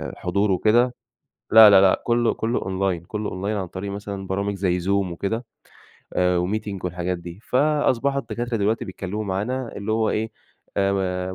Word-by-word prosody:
حضور 100 +3 0
وكده 120 +6 +3 0.6
لا، 110 -1 +10
لا، 100 -1 +7
لأ 95 - +4
كله 120 0 +2
كله 115 +2 -1
أونلاين، 95 -3 -1
كله 105 +2 -4
online 100 +3 -3
عن 95 - -5
طريق 95 +3 -6
مثلًا 100 -1 -6
برامج 100 +2 -1
زي 90 -2 0
Zoom 90 - -6 0.2
وكده، 105 +7 -3 0.7
آآ 90 -1 +2
وMeeting 105 -2 -4
والحاجات 90 0 -2
دي. 85 +3 -10
فاصبحوا 140 -1 +2
الدكاترة 120 -2 -3
دلوقتي 110 +3 0
بيتكلموا 95 +2 -5
معانا، 115 +6 -3
اللي 105 +2 -3
هو 110 0 +1
إيه؟ 110 +1 -1 0.5
آآ 100 0 +2
م 95 -1 -2
100 Hz, 165 wpm, -23 LUFS, 95-110 Hz, 0.7 s, لا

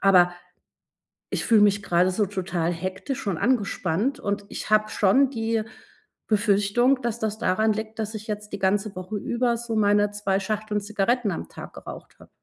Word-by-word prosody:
aber 180 -2 +5 1.0
ich - - -2
fühle 225 -2 +5
mich 205 0 +3
gerade 180 0 +2
so 205 +3 +1
total 180 -3 -2
hektisch 190 - -4
und 180 - -1
angespannt, 215 0 0
und 200 0 -2
ich - - -6
habe 215 0 +4
schon 260 +7 +3
die 225 -2 -1 0.7
Befürchtung, 215 +5 +2
dass 235 -1 -2
das 220 0 -2
daran 215 +3 +2
liegt, 220 +1 -5
dass 220 0 -3
ich 215 0 -7
jetzt 210 0 -5
die 200 - -3
ganze 195 +1 0
Woche 185 +3 -5
über 235 +3 0
so 230 -1 -4
meine 205 0 +3
2 200 -1 0
Schachteln 210 +1 -2
Zigaretten 210 +2 0
am 85 - -5
Tag - - -10
geraucht - - -10
habe. - - -16
210 Hz, 175 wpm, -25 LUFS, 195-220 Hz, 1.0 s, aber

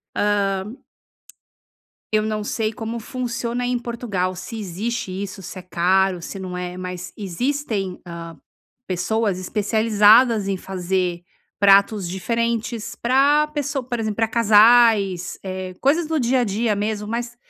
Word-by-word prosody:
Hã. 200 -2 +1 1.5
Eu 215 0 +2
não 215 -1 -2
sei 215 +1 -2
como 225 +1 -5
funciona 240 +1 -3
em 245 0 0
Portugal, 225 -6 -3
se 225 +5 -7
existe 205 +2 -4
isso, 195 0 -6
se 185 +1 -8
é - - -12
caro, 180 +1 +1
se 195 +3 -7
não 180 -1 -5
é. 180 0 -5
Mas 180 -1 -6
existem, 205 - -2
hã, 170 -2 -8 0.5
pessoas 200 +1 -1
especializadas 215 +2 +4
em 195 -1 -1
fazer 180 -2 -2 0.3
pratos 200 -1 +4
diferentes, 230 +4 -2
pra 280 +5 +3
pesso 290 -2 -3
por 245 -1 -4
exemplo, 215 -2 -2
pra 225 - +2
casais, 220 -4 +4
eh, 185 -1 -5
coisas 305 +5 +2
do 320 -1 0
dia 255 0 +2
a - - +2
dia 215 +1 0
mesmo, 210 +1 -2
mais 235 +2 -4
210 Hz, 135 wpm, -22 LUFS, 190-235 Hz, 1.5 s, especializadas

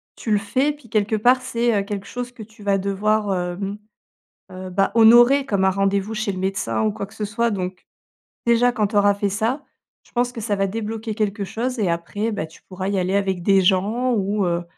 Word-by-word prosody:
tu 220 - -4
le 210 - +4
fais, 255 +9 +1
puis 290 -5 -14
quelque 215 0 +1
part, 245 +4 +4
c'est, 235 -4 0
heu, - - -4
quelque 200 0 -5
chose 245 0 -5
que 230 -3 -10
tu 220 +1 -17
vas 200 -1 +2
devoir, 205 +1 0
hem, 185 +3 -3 0.7
heu, 185 0 -7
bah 195 +2 +1
honorer 240 +5 +7
comme 200 -7 0
un - - +5
rendez-vous 195 +2 0
chez 215 -2 -1
le 185 - -6
médecin, 185 - -1
ou 110 - +2
quoi 200 - -5
que 200 - -18
ce 210 - -4
soit. 230 +3 0
Donc, 185 -2 -4 0.6
déjà, 235 +1 +4
quand 215 -4 0
t'auras 205 -1 +3
fait 200 0 -1
ça, 225 +8 -1 0.4
je - - -25
pense 245 0 +1
que 235 - -7
ça 210 -1 -1
va 195 0 0
débloquer 220 +1 -4
quelque 205 -2 -1
chose. 250 +6 -3
Et 195 - +1
après, 205 +7 -2
bah, 200 -6 -3
tu 160 - -18
pourras 185 0 -6
y 200 - 0
aller 185 +2 0
avec 190 -3 0
des 195 0 +4
gens 210 +7 +1
ou, 205 -1 0
heu, 170 0 0
205 Hz, 225 wpm, -22 LUFS, 195-230 Hz, 0.7 s, honorer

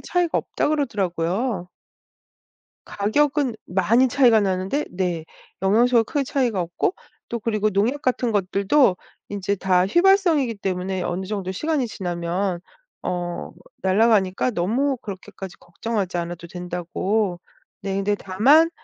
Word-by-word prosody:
차이가 355 -2 0
없다 - - -1
그러더라고요. 195 - -1 1.2
가격은 270 +4 +1
많이 230 +8 +3
차이가 245 -4 +5
나는데 195 +8 -1
네 175 -3 -2 0.4
영양소가 230 +4 +4
크게 285 +4 -1
차이가 245 -8 0
없고 175 - -1 0.3
또 235 - -3
그리고 215 -1 0
농약 220 +8 0
같은 250 -2 0
것들도 200 +2 +2 0.3
인제 200 0 -1
다 185 -1 +2
휘발성이기 345 - +3
때문에 185 -1 -2
어느 180 +2 -3
정도 195 -2 -3
시간이 275 - -1
지나면 175 -1 -2 0.4
어 175 -1 -3 0.3
날아가니까 195 +2 +3
너무 245 +9 0
그렇게까지 190 -3 -9
걱정하지 185 +1 -3
않아도 170 0 -5
된다고 180 +2 -2 0.4
네 195 0 -3
근데 195 +1 +1
다만 255 - +4
200 Hz, 300 characters per minute, -23 LUFS, 185-245 Hz, 1.2 s, 차이가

